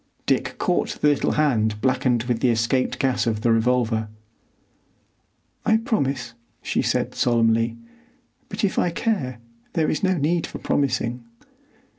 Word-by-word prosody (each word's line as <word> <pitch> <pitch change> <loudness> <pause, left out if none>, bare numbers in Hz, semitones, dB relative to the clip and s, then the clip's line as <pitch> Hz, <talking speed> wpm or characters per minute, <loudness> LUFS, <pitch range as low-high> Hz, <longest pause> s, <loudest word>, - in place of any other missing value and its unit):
Dick - - 0
caught - - 0
the 150 - +4
little 145 - +1
hand 110 -8 +1
blackened 125 -1 +1
with 120 -2 -1
the 125 - +2
escaped 120 +3 +1
gas 130 -2 0
of 110 -2 -1
the 120 0 +2
revolver. 115 -1 +1 1.6
"I 220 - +4
promise," 140 - -1 0.3
she - - 0
said - - 0
solemnly; 115 -1 +2 0.7
"but 200 +2 -5
if 200 - +1
I - - +2
care 165 - -1 0.4
there 160 -2 +1
is - - -2
no 185 -2 +2
need 165 +3 0
for - - -7
promising." 125 -3 -1
125 Hz, 140 wpm, -23 LUFS, 115-150 Hz, 1.6 s, the